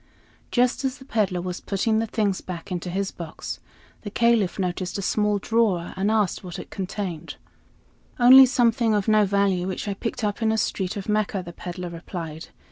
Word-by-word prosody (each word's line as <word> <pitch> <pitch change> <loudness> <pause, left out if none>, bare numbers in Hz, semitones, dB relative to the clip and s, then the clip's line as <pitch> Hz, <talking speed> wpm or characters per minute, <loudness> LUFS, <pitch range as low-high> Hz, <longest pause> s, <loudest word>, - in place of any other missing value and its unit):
Just 250 +2 +2
as 265 0 -1
the 265 - -14
peddler 200 -8 0
was 180 0 -5
putting 220 +3 0
the 225 - -1
things 205 -3 0
back 180 +1 -7
into 180 0 -3
his 195 +2 -2
box, 165 -2 -7 0.4
the 205 - -6
Caliph 230 -3 +2
noticed 185 0 -2
a - - -3
small 210 +1 +1
drawer 200 -5 +1
and 195 +2 0
asked 215 -4 +1
what 180 -2 -7
it - - -9
contained. 185 -4 -5 0.8
"Only 260 +2 +9
something 235 -3 +2
of 205 -2 0
no 215 -1 +5
value, 195 -2 +1
which 190 +2 -4
I 200 - 0
picked 230 +3 -4
up 210 +2 -1
in 220 -1 +2
a 220 - +1
street 190 -3 -1
of 195 - -6
Mecca," 210 -3 0
the 170 - -8
peddler 175 +1 -6
replied. 165 -2 -7
200 Hz, 190 wpm, -24 LUFS, 180-220 Hz, 0.8 s, Only